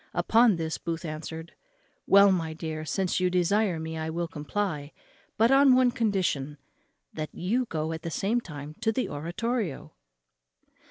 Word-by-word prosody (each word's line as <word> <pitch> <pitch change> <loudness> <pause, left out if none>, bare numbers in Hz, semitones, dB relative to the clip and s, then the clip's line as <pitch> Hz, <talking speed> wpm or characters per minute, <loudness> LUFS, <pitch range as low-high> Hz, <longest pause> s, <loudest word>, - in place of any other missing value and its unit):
Upon 230 -2 +4
this 160 -1 -3
Booth 165 0 -4
answered, 160 +1 -6 0.5
"Well, 200 0 +7
my 165 -4 -1
dear, 155 -1 -5
since 185 +5 0
you 180 0 +2
desire 180 0 +1
me, 160 0 -5
I 160 0 -3
will 170 +1 -2
comply, 150 -1 -3 0.4
but 230 +3 +4
on 270 -1 +6
one 255 -1 +4
condition, 185 - -1 0.6
that 155 -1 -4
you 230 +9 0
go 160 -2 -2
at 160 0 -5
the 165 - -4
same 215 +8 0
time 150 -5 -8
to 225 - +2
the 250 +3 -1
oratorio." 175 - -3
170 Hz, 155 wpm, -27 LUFS, 160-210 Hz, 0.6 s, Well